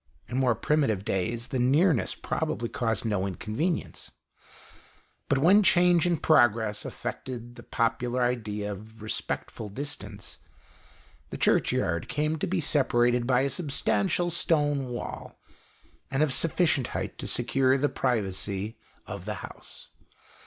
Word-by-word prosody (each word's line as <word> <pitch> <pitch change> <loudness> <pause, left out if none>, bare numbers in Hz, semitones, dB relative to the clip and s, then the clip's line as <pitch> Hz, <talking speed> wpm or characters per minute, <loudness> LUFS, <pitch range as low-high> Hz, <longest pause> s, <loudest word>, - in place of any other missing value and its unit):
In 125 - -2
more 125 -3 +3
primitive 125 -11 +1
days, 115 +5 -2
the 130 - -1
nearness 140 +4 +3
probably 115 - -2
caused 115 -6 -1
no 100 -3 0
inconvenience; 115 - -3 1.2
but 140 - +3
when 180 +9 +6
change 175 -3 +4
and 170 -3 +1
progress 110 -8 +3
affected 120 -2 -6
the 120 - -12
popular 120 +2 0
idea 105 -4 -2
of 110 +2 -10
respectful 110 0 -4
distance, 140 +8 -6 0.9
the - - -6
Churchyard 85 +1 +1
came 155 +1 -1
to - - -1
be 185 0 0
separated 120 -5 +2
by 130 -1 +3
a 140 - +1
substantial 175 +4 0
stone 145 -5 +2
wall, 120 -1 -6 0.7
of 135 +1 +1
sufficient 160 -5 +3
height - - -5
to - - -4
secure 130 +2 +2
the 145 +2 +2
privacy 105 -4 -2 0.3
of - - -7
the - - -3
house. - - -11
125 Hz, 125 wpm, -27 LUFS, 110-150 Hz, 1.2 s, when